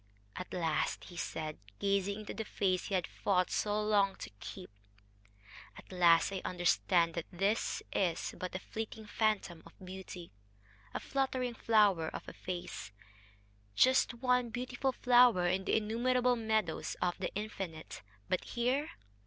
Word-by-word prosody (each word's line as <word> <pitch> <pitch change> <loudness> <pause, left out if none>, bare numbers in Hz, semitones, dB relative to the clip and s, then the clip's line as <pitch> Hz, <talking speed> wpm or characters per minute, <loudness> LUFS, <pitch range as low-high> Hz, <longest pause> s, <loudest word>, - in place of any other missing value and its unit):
"At 180 - -6
last," 165 -3 0
he 175 - -11
said, 155 -2 -4 0.2
gazing 200 +1 0
into 210 - -6
the 220 - -3
face 185 -3 0
he 195 - -1
had 180 -3 +1
fought 185 -3 0
so 210 0 0
long 205 -2 +3
to - - -8
keep 90 +2 -8 1.1
"at - - -13
last 175 -1 +5
I 190 - -3
understand 175 -1 +2
that 170 -1 -4
this 195 +5 0
is 175 -4 0
but 185 0 -5
a - - -1
fleeting 220 +2 -6
phantom 210 -6 0
of - - -15
beauty, 185 -2 -9 0.6
a - - 0
fluttering 260 -2 -1
flower 205 -8 +3
of - - -6
a - - -7
face 175 - -6 0.8
just 260 -1 +4
one 250 0 +2
beautiful 250 +3 -2
flower 245 -7 +5
in 185 +2 +1
the - - +3
innumerable 245 +3 +2
meadows 220 -7 -1
of 175 -1 0
the - - -2
Infinite 195 -6 -5 0.3
but 185 - 0
here...." 255 +5 0
200 Hz, 145 wpm, -33 LUFS, 180-230 Hz, 1.1 s, last